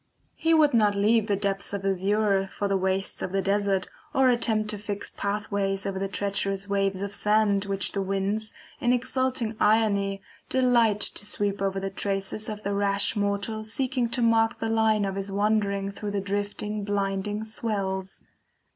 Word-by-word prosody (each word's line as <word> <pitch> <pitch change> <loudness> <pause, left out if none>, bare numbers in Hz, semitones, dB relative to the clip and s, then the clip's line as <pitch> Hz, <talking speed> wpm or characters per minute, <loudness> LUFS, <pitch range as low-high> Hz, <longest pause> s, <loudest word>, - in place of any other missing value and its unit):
He 325 0 +2
would 300 -3 +4
not 210 -3 +4
leave 215 +2 +3
the 205 - +2
depths 200 0 -2
of 200 -1 -3
azure 195 +1 +1
for 205 - -2
the 195 - +1
wastes 190 +1 -1
of - - -3
the 195 0 +1
desert, 195 -1 +1 0.3
or 265 -1 +5
attempt 220 -3 +2
to 210 - -6
fix 205 -1 -4
pathways 200 -1 -2
over 195 -1 -2
the 195 - -1
treacherous 195 0 -1
waves 195 -1 0
of 200 - -4
sand, 210 -1 +2
which 195 -1 0
the 200 - -2
winds, 195 +3 0 0.3
in 245 +1 +2
exulting 255 -2 -1
irony, 200 -2 +2 0.3
delight 235 -5 +3
to - - -1
sweep 205 -1 0
over 195 0 0
the 195 0 -4
traces 195 +2 -3
of 210 0 -6
the 200 - -1
rash 200 +1 +1
mortal 205 +1 -1
seeking 250 +2 -1
to 240 +1 0
mark 225 0 +3
the 225 0 -2
line 220 -2 +2
of 195 - -2
his 195 0 -4
wandering 200 -1 +1
through 205 +1 -5
the 205 0 -1
drifting, 205 +1 -3
blinding 200 +1 -1
swells. 195 -4 -3
205 Hz, 175 wpm, -26 LUFS, 195-220 Hz, 0.3 s, or